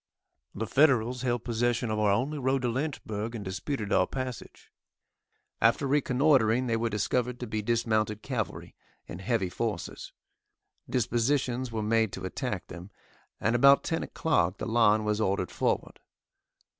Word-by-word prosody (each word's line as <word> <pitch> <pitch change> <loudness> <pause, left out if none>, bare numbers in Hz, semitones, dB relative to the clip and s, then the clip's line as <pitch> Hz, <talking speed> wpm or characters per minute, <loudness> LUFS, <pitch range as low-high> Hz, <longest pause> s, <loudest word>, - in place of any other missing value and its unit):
The 110 - -2
Federals 125 -2 +3
held 120 -2 -1
possession 120 0 0
of 110 - -1
our 105 -1 +3
only 135 +9 0
road 130 0 0
to 120 - +1
Lynchburg, 115 -5 -3
and 105 -3 -6
disputed 100 +4 -3
our 90 - +3
passage. 130 -2 -7 0.9
After 115 +5 +3
reconnoitering, 130 -3 +3
they 115 -2 0
were 115 +1 0
discovered 125 +4 -1
to 125 - -4
be 110 -1 -3
dismounted 110 -1 0
cavalry, 125 -6 -4 0.3
in 85 - -8
heavy 100 -2 0
forces. 110 +3 -4 0.8
Dispositions 125 +1 0
were 110 -1 -2
made 110 -1 +2
to 95 - -6
attack 100 -1 -4
them, 90 +2 -10 0.5
and 115 +2 +1
about 140 +3 +6
10 165 - -1
o'clock 90 - 0
the - - -4
line 110 -2 +3
was 105 0 0
ordered 95 -3 0
forward. - - -1
115 Hz, 145 wpm, -28 LUFS, 105-125 Hz, 0.9 s, about